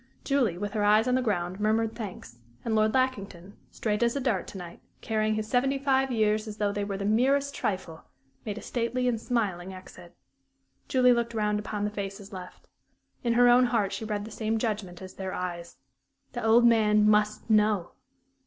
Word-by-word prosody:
Julie, 255 Hz, -11 st, +1 dB
with 205 Hz, +2 st, -4 dB
her 210 Hz, -2 st, 0 dB
eyes 215 Hz, +3 st, +4 dB
on 250 Hz, -, +2 dB
the 255 Hz, -, +2 dB
ground, 185 Hz, -5 st, -2 dB
murmured 220 Hz, +1 st, +1 dB
thanks; 180 Hz, -, -8 dB, 0.3 s
and 230 Hz, -, -1 dB
Lord 215 Hz, 0 st, +3 dB
Lackington, 200 Hz, -7 st, -2 dB
straight 210 Hz, -1 st, -2 dB
as 235 Hz, +1 st, +2 dB
a -, -, 0 dB
dart 240 Hz, -8 st, -1 dB
to -, -, -8 dB
night, 175 Hz, -2 st, -9 dB, 0.2 s
carrying 215 Hz, -1 st, 0 dB
his 215 Hz, 0 st, -3 dB
seventy 270 Hz, +3 st, +1 dB
five 270 Hz, -1 st, +1 dB
years 215 Hz, -1 st, +1 dB
as 210 Hz, -1 st, -7 dB
though 205 Hz, -1 st, 0 dB
they 205 Hz, 0 st, -2 dB
were 200 Hz, -1 st, -3 dB
the 200 Hz, -, -4 dB
merest 275 Hz, +6 st, +2 dB
trifle, 185 Hz, -5 st, -4 dB, 0.4 s
made 210 Hz, -1 st, -5 dB
a -, -, -8 dB
stately 250 Hz, +1 st, -1 dB
and 230 Hz, -3 st, 0 dB
smiling 190 Hz, -7 st, -2 dB
exit. 185 Hz, -, -13 dB, 0.7 s
Julie 250 Hz, -1 st, +4 dB
looked 235 Hz, -1 st, -2 dB
round 210 Hz, -1 st, 0 dB
upon 210 Hz, 0 st, -4 dB
the 210 Hz, -, -2 dB
faces 200 Hz, 0 st, -6 dB
left. 180 Hz, -1 st, -10 dB, 0.6 s
In 235 Hz, -1 st, +1 dB
her 245 Hz, +1 st, +5 dB
own 245 Hz, +1 st, +6 dB
heart 220 Hz, -5 st, 0 dB
she 195 Hz, -, -4 dB
read 210 Hz, -1 st, -3 dB
the 220 Hz, -, -10 dB
same 220 Hz, +1 st, -1 dB
judgment 205 Hz, -6 st, -3 dB
as 185 Hz, -, -8 dB
in -, -, -22 dB
their 190 Hz, -1 st, -4 dB
eyes: 175 Hz, -1 st, -5 dB, 0.6 s
"_The 240 Hz, -, -4 dB
old 225 Hz, +2 st, +5 dB
man 210 Hz, -2 st, +4 dB
must 210 Hz, 0 st, +2 dB
know! 210 Hz, -4 st, +2 dB
215 Hz, 200 wpm, -27 LUFS, 200-235 Hz, 0.7 s, own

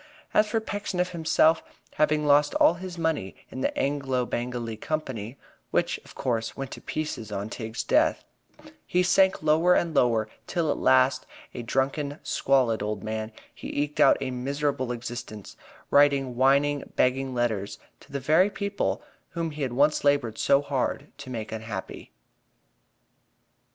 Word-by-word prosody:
As 210 Hz, -, +4 dB
for 225 Hz, +1 st, 0 dB
Pecksniff 205 Hz, -4 st, -2 dB
himself, 160 Hz, -1 st, +3 dB, 0.3 s
having 150 Hz, 0 st, +2 dB
lost 145 Hz, 0 st, +4 dB
all -, -, +5 dB
his 180 Hz, 0 st, -8 dB
money 160 Hz, -, -1 dB, 0.2 s
in 130 Hz, -, -6 dB
the -, -, -1 dB
Anglo 135 Hz, -3 st, 0 dB
Bengalee 120 Hz, -2 st, -3 dB
Company 130 Hz, -4 st, -4 dB, 0.3 s
(which, -, -, 0 dB
of -, -, -15 dB
course, 115 Hz, -3 st, -2 dB
went 135 Hz, -1 st, -5 dB
to -, -, -8 dB
pieces 150 Hz, -8 st, -4 dB
on 105 Hz, +2 st, -4 dB
Tigg's 110 Hz, 0 st, -4 dB
death), -, -, +2 dB, 0.6 s
he 180 Hz, +1 st, +2 dB
sank 190 Hz, -1 st, +3 dB
lower 160 Hz, +4 st, +4 dB
and 170 Hz, -2 st, 0 dB
lower, 115 Hz, -6 st, +2 dB, 0.2 s
till 170 Hz, -3 st, 0 dB
at -, -, -2 dB
last, 130 Hz, 0 st, +3 dB, 0.3 s
a -, -, -5 dB
drunken, 140 Hz, +4 st, -1 dB
squalid 130 Hz, -5 st, +2 dB
old 105 Hz, -1 st, -3 dB
man, 110 Hz, 0 st, -4 dB, 0.2 s
he -, -, -5 dB
eked 150 Hz, 0 st, -2 dB
out -, -, +6 dB
a 130 Hz, -1 st, -2 dB
miserable 135 Hz, 0 st, -2 dB
existence 120 Hz, -3 st, -7 dB, 0.4 s
writing 140 Hz, -3 st, +4 dB
whining 140 Hz, +3 st, +2 dB
begging 130 Hz, 0 st, +1 dB
letters 110 Hz, -5 st, -1 dB, 0.2 s
to -, -, -19 dB
the 140 Hz, -, -2 dB
very 160 Hz, +9 st, +4 dB
people 200 Hz, 0 st, -2 dB, 0.3 s
whom 165 Hz, -2 st, -2 dB
he 150 Hz, 0 st, -7 dB
had 130 Hz, -3 st, -1 dB
once 145 Hz, +4 st, +3 dB
labored 140 Hz, -6 st, +1 dB
so 140 Hz, 0 st, +3 dB
hard 140 Hz, +1 st, -2 dB
to 140 Hz, -2 st, -9 dB
make 115 Hz, -4 st, -5 dB
unhappy. 110 Hz, -3 st, -6 dB
135 Hz, 150 wpm, -26 LUFS, 120-155 Hz, 0.6 s, out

